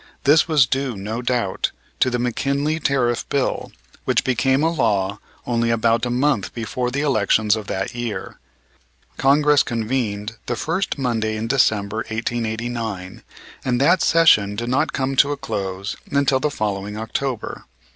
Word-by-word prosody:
This 155 +3 +5
was 150 -5 +5
due, 130 -2 -2
no 110 +5 -4
doubt, 120 -6 0 0.3
to 130 - +4
the 125 - -1
McKinley 140 +5 -1
Tariff 125 -5 +1
Bill 140 -2 -1 0.3
which - - +1
became 130 +3 +2
a 165 - +3
law 105 - 0 0.3
only 115 -1 0
about 115 +1 +2
a - - -3
month 125 -4 0
before 125 +2 -2
the 140 +3 -2
elections 110 -6 +2
of 110 -2 -6
that 95 +6 -3
year. 120 -3 -5 0.8
Congress 145 +1 +4
convened 115 -2 -2
the 120 - -1
first 165 +9 -2
Monday 115 -5 -1
in 110 - -3
December, 110 -4 +1
1889, 115 -3 -3 0.4
and 125 -2 0
that 170 +6 +4
session 110 -12 +4
did 120 +3 -3
not 130 - +1
come 135 0 -1
to 145 +2 +5
a - - -6
close 95 -4 -4
until 140 -1 +2
the 150 - 0
following 105 -4 -3
October. 120 +2 -4
120 Hz, 150 wpm, -21 LUFS, 110-135 Hz, 0.8 s, This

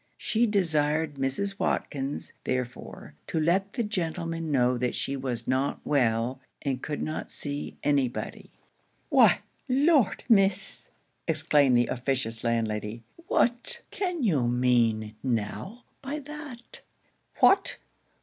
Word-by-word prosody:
She 230 +2 +1
desired 160 -6 +1
Mrs. 165 +10 -1
Watkins, 140 0 -2
therefore, 125 - -4
to 165 - -1
let 190 +5 +1
the 240 - -1
gentleman 165 -5 -2
know 125 -3 +3
that 125 0 -1
she 140 - -2
was 130 -3 -3
not 130 +2 0
well, 125 -1 +1 0.2
and 130 -3 -1
could 150 - -3
not 155 - -4
see 145 0 -3
any 140 -3 +3
body. 120 - -7 0.6
'Why, - - +5 0.3
Lord, 275 - +3
Miss!' 195 -3 +3 0.4
exclaimed 150 -5 +4
the 120 - +4
officious 125 -3 -1
landlady, 115 -1 -1 0.2
'what 245 - +1
can 360 -7 -2
you 150 - +2
mean 120 -3 +2
now 130 - -3 0.2
by 280 +2 -4
that? 290 -4 -9 0.6
What! 390 - +4
145 Hz, 120 wpm, -27 LUFS, 125-200 Hz, 0.6 s, Why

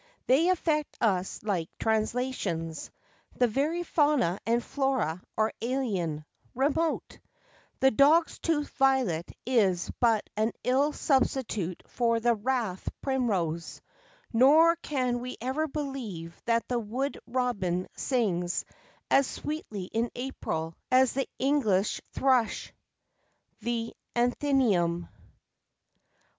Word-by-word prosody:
They 305 +8 +4
affect 315 -4 0
us 190 -4 0
like 185 -6 -1
translations; 220 -8 -1 0.5
the 250 - +3
very 295 +9 0
fauna 290 - +2
and 235 +1 +2
flora 260 - -1 0.2
are 220 0 +2
alien, 200 - -1 0.3
remote; 305 +5 0 0.6
the 265 0 +6
dog's 300 +7 +4
tooth 300 -3 0
violet 260 - +1
is 200 -8 +2
but 225 -3 +3
an 220 +2 +1
ill 270 +4 +2
substitute 245 - 0
for 230 -1 +1
the 235 0 +3
rathe 225 -4 -1 0.2
primrose, 195 - -1 0.5
nor 305 +8 +6
can 255 -7 -1
we 250 +1 -6
ever 265 +6 -1
believe 255 - -5
that 230 0 +1
the 245 -1 0
wood 250 +6 -3
robin 205 -8 -1
sings 185 -9 0 0.5
as 275 -1 +5
sweetly 295 -10 -5
in 225 +6 -1
April 165 -11 -3 0.2
as 255 -1 +4
the 270 +1 -2
English 235 -8 +1
thrush." 255 -4 +1 0.9
_The 230 -1 -2 0.2
Athenæum. 240 - +2
240 Hz, 105 wpm, -28 LUFS, 200-270 Hz, 0.9 s, the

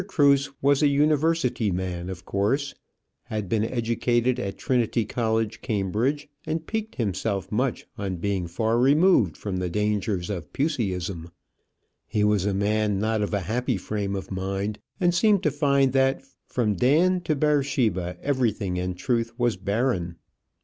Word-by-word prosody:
Cruse 140 -6 +3
was 140 +1 +4
a 150 - +5
University 145 -4 +2
man, 90 -1 -3
of 95 0 -7
course; 135 +9 0 0.5
had 105 -3 -4
been 105 +3 +1
educated 120 +1 0
at 100 -5 -4
Trinity 120 -3 +1
College 115 -1 -1
Cambridge, 110 +8 -1 0.2
and 160 0 -3
piqued 220 +2 -4
himself 100 -3 -2
much 125 +4 -1
on 95 -2 -2
being 95 0 -2
far 110 +7 0
removed 140 - +4
from 100 -3 -4
the 90 -1 -2
dangers 105 -1 -1
of 95 -4 -5
Puseyism. 95 - -2 0.8
He 105 - 0
was 105 -2 +2
a 100 - +1
man 105 0 +1
not 110 +1 0
of 105 - -1
a 100 -2 0
happy 120 +5 -1
frame 100 +1 -3
of 95 0 -6
mind, 95 +2 -3 0.2
and 175 -2 +3
seemed 205 +2 +3
to 150 - +2
find 140 -2 +2
that 135 0 +2 0.2
from 110 -4 0
Dan 165 - +3
to 155 - +1
Beersheba 135 - +1
everything 115 -9 0
in 90 0 -2
truth 115 +4 -1
was 120 -2 +1
barren. 95 -3 -1
110 Hz, 150 wpm, -25 LUFS, 100-135 Hz, 0.8 s, a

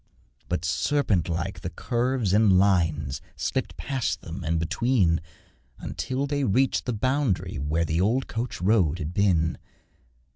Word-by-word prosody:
But 90 -1 -1
serpent 100 - +1
like 85 0 -3
the - - -4
curves 120 -4 -1
and 105 -3 +5
lines 80 -8 +2
Slipped - - -2
past 130 -3 -2
them, 85 +1 -7
and 80 +1 0
between, 90 0 +1 0.6
Until 130 +2 -3
they 145 0 -1
reached 130 +4 +2
the 125 - -1
bound'ry 130 -1 0
where 75 +4 0
The 80 +2 0
old 120 +7 +1
coach 115 +1 -4
road 90 -6 +3
had 80 -1 -5
been. 85 -5 +2
100 Hz, 140 wpm, -26 LUFS, 85-125 Hz, 0.6 s, and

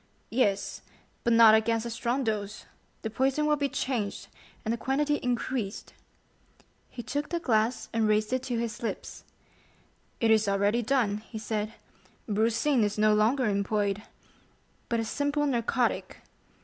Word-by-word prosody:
"Yes, 205 -5 0 0.4
but 235 - +2
not 230 -1 +8
against 225 +1 +2
a 235 - -4
strong 240 +3 -1
dose; 210 -2 -3 0.4
the 220 - -3
poison 270 +5 +1
will 300 0 +3
be 285 -1 -1
changed, 245 -6 -3 0.4
and 220 - 0
the - - -2
quantity 295 +4 +1
increased." 245 -4 -3 1.0
He 240 - -8
took 290 +4 -3
the 340 - -1
glass 230 -4 +1
and 225 -1 +2
raised 215 +2 +1
it 255 - +1
to 245 -3 -2
his 230 -1 -3
lips. 230 - -5 1.0
"It 225 -1 +3
is 220 -1 +4
already 200 +4 +2
done," 235 -4 +1
he 220 +1 -9
said; 215 0 -3 0.5
"brucine 225 +4 +2
is 210 0 -1
no 215 0 +4
longer 230 +5 +3
employed, 200 0 0 0.9
but 235 - +1
a 225 - -1
simple 285 +5 0
narcotic! 240 -2 0
230 Hz, 150 wpm, -28 LUFS, 215-255 Hz, 1.0 s, not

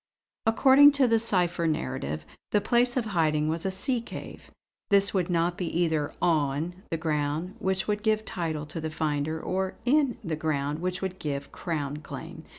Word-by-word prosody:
According 275 +5 +7
to 275 -3 +4
the 225 -1 +3
cipher 180 -6 +2
narrative 130 - -2 0.2
the 210 - +3
place 240 +4 +2
of 245 - +1
hiding 155 -6 +1
was 165 +3 -1
a - - +1
sea 235 +6 -1
cave. - - -9 0.4
This 200 -1 +5
could 185 -3 0
not 170 +1 +1
be 180 - -1
either 160 -4 +1
'on' 155 0 +1 0.2
the 165 - -1
ground, 155 +2 -1
which 190 0 -1
would 210 0 0
give 215 0 +1
title 160 -4 -3
to 160 +2 -6
the 160 - -3
finder; 155 0 -1
or 190 +3 -2
'in' 275 -2 +3
the 165 -4 -2
ground 150 -1 -1
which 185 +2 -3
would 185 -1 -4
give 140 -2 -4
Crown 150 -4 -3
claim. 150 - -9
170 Hz, 175 wpm, -27 LUFS, 155-205 Hz, 0.4 s, According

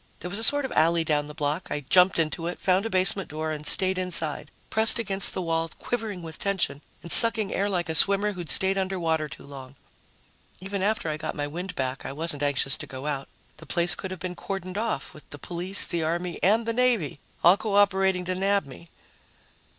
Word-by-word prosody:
There 180 - -6
was 200 - -2
a - - -2
sort 290 +4 +4
of - - -6
alley 165 +1 +2
down 150 -2 -1
the 150 - -11
block. 150 +4 -3
I 150 - -4
jumped 180 +7 +3
into 165 +1 -2
it, 175 - -6
found 190 +3 +1
a - - -7
basement 190 -1 +2
door 155 +1 -4
and 150 -1 -5
stayed 185 -1 +4
inside, 165 -5 +1 0.2
pressed 220 +1 +4
against 195 -4 -2
the 185 - -3
wall, 165 0 -2
quivering 220 -7 -5
with 160 -1 -8
tension 190 -8 -2 0.2
and 170 - -3
sucking 225 -3 +8
air 200 +1 -1
like 180 -3 -2
a 160 - -3
swimmer 200 +5 +4
who'd 175 -5 -8
stayed 195 +4 +2
underwater 165 -5 -2
too - - -11
long. 135 -1 -12 0.8
Even 195 +1 -5
after 215 -2 -1
I 155 -1 -3
got 155 - -6
my 145 - -3
wind 175 +6 -7
back, 130 0 -4
I - - -6
wasn't 150 -1 0
anxious 140 -1 0
to - - -7
go 130 +1 -8
out. 140 -2 -4 0.3
The 165 - -14
place 175 0 +2
could 190 - -5
have 185 -2 -8
been 180 +1 -5
cordoned 185 0 -6
off, 215 -9 -4
with 150 - -16
the 145 - -6
police, 180 +5 -3
the 170 -2 +1
army 170 +2 -3
and 220 +5 +2
the 230 - -2
navy 235 - 0 0.2
all 175 +3 +7
cooperating 195 -3 +1
to 185 - -2
nab 195 -1 0
me. 140 +5 -13
180 Hz, 215 wpm, -25 LUFS, 155-195 Hz, 0.8 s, sucking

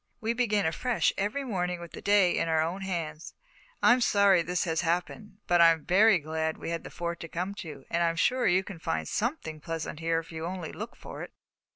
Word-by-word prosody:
We 230 0 -1
begin 215 -4 +1
afresh 230 +10 +1
every 210 +8 -1
morning 180 -7 -2
with 170 -1 -9
the - - -9
day 200 -3 +4
in - - 0
our 160 -1 +2
own 175 +4 -3
hands. 165 -5 -4 0.5
I'm 245 +1 +6
sorry 200 -5 +4
this 175 +1 -1
has 165 -2 0
happened; 180 +4 -2
but 175 -1 +4
I'm 165 -2 +5
very 205 +2 +5
glad 160 0 -2
we - - -5
had 170 - -3
the - - -8
Fort 170 0 -4
to 165 - -7
come 180 +4 -3
to, 145 -5 -9
and 170 - -1
I 170 - +3
am 165 - -3
sure 245 +7 +2
you 185 +1 +3
can 190 -4 -9
find 80 - -2
something 210 - -3
pleasant 165 -1 -5
here 165 0 0
if 165 +1 -5
you 160 0 -6
only 180 -3 -5
look 215 +3 -7
for - - -9
it." - - -7
175 Hz, 225 wpm, -28 LUFS, 165-200 Hz, 0.5 s, I'm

